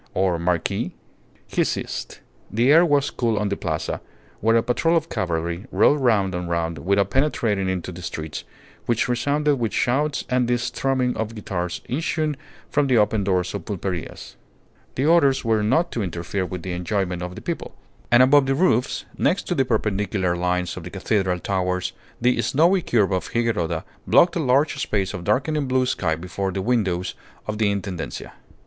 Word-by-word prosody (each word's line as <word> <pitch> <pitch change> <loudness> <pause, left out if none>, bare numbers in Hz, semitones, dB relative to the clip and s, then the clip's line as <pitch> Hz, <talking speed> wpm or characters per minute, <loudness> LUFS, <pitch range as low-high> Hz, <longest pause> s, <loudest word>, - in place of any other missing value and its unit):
or 90 -2 +1
marquis.. 85 -1 -1 0.3
." - - -33
He - - +4
ceased. - - -4 0.3
The 120 +6 +3
air 165 +3 +7
was 145 -4 +2
cool 115 -3 0
on 105 -1 0
the 100 - -1
Plaza, - - -3 0.4
where 115 +2 +3
a 115 - +4
patrol 165 +7 +2
of 165 0 -2
cavalry 85 +4 -2
rode 145 - +4
round 105 -7 +2
and 90 -1 -3
round 85 -2 -1
without 100 +4 +1
penetrating 115 -9 +1
into 90 -1 -3
the 90 +1 -9
streets, 80 -2 -5 0.4
which 120 -1 +1
resounded 145 +4 +1
with 115 -3 -1
shouts 145 +4 0
and 125 -1 +1
the 120 0 +2
strumming 125 +1 0
of 110 +1 -3
guitars 90 -4 -4
issuing 155 +2 -1 0.4
from 145 -1 +2
the 130 -3 +3
open 105 -1 +2
doors 90 -2 0
of 100 -5 -5
pulperias. 95 -4 -5 0.6
The 135 - 0
orders 145 -6 +4
were 110 -2 +2
not 145 +11 +2
to 115 - -2
interfere 90 +1 -3
with 90 -2 -6
the 95 - -4
enjoyments 90 0 -2
of 90 0 -6
the - - -8
people. - - -5 0.4
And 120 +1 +7
above 135 +1 +5
the 135 - +2
roofs, 135 -7 +1
next 195 - +2
to - - +2
the 135 -6 +2
perpendicular 100 -4 0
lines 90 0 -1
of 90 - -6
the 90 - -7
cathedral 95 -1 0
towers 90 -1 -1 0.3
the 125 +1 +2
snowy 175 +6 +3
curve 105 - +2
of 90 -3 -1
Higuerota 95 -9 0 0.2
blocked 170 0 +5
a - - 0
large 140 0 +2
space 100 -5 -1
of 90 -3 -5
darkening 145 - +1
blue 130 0 +2
sky 85 -9 0
before 90 +3 -3
the 95 +1 -3
windows 95 -7 0 0.3
of 105 0 -4
the 105 -2 +3
Intendencia. 95 -4 -5
105 Hz, 180 wpm, -23 LUFS, 90-130 Hz, 0.6 s, air